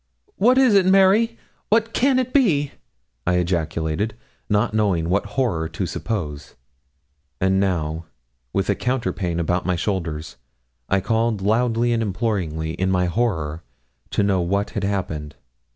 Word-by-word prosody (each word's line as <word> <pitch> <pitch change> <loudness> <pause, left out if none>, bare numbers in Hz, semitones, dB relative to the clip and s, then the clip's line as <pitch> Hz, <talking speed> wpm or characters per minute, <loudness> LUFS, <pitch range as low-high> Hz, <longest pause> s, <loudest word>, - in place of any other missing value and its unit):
'What 250 +5 +4
is 260 -4 +5
it, 195 -2 +5
Mary? 195 +5 +4 0.3
what 225 +1 +2
can 265 +1 +3
it 255 -1 -1
be?' 160 - +3 0.6
I 90 - +3
ejaculated, 85 +2 -1 0.3
not 105 0 +1
knowing 95 -6 +1
what 100 +2 +1
horror 85 -12 0
to 80 - -3
suppose. 75 -10 -4 0.8
And 95 +1 +2
now, 85 -4 -1 0.5
with 95 - 0
a 100 - +3
counterpane 105 -8 -2
about 90 +2 0
my 90 - +2
shoulders, 85 - -3 0.5
I 95 0 +2
called 110 -1 0
loudly 120 +2 +2
and 115 - +1
imploringly, 95 -7 -2
in 95 +3 -1
my 90 -1 +2
horror, 85 -6 -1 0.5
to - - +1
know 95 -2 +2
what 100 +4 -1
had 100 - -3
happened. 80 -7 -3
100 Hz, 140 wpm, -22 LUFS, 85-120 Hz, 0.8 s, is